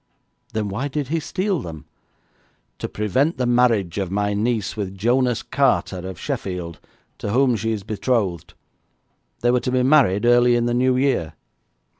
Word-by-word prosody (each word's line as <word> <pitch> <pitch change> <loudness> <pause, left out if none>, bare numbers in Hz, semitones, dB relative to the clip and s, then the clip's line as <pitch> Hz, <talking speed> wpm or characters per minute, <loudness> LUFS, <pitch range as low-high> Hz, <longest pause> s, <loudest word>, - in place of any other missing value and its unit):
'Then 110 -2 -1
why 105 +8 -3
did 145 -1 -3
he 165 +2 0
steal 185 +3 -1
them?' 80 -7 -8 0.9
'To - - -4
prevent 130 - 0
the 125 - 0
marriage 115 -7 +2
of 95 -2 -2
my 100 +2 0
niece 110 0 -1
with 100 -2 -5
Jonas 120 +3 +1
Carter, 90 - +1
of 95 - -9
Sheffield, 90 -4 -4 0.4
to - - -4
whom 125 +2 +3
she 115 +1 -2
is 105 -3 -3
betrothed. 100 -6 -2 0.9
They 120 - +3
were 125 - +3
to 125 +1 -3
be 130 0 +2
married 125 -8 +4
early 120 0 +5
in 120 0 +1
the 120 - 0
New 125 +1 +2
Year.' 130 - 0
120 Hz, 165 wpm, -22 LUFS, 100-125 Hz, 0.9 s, early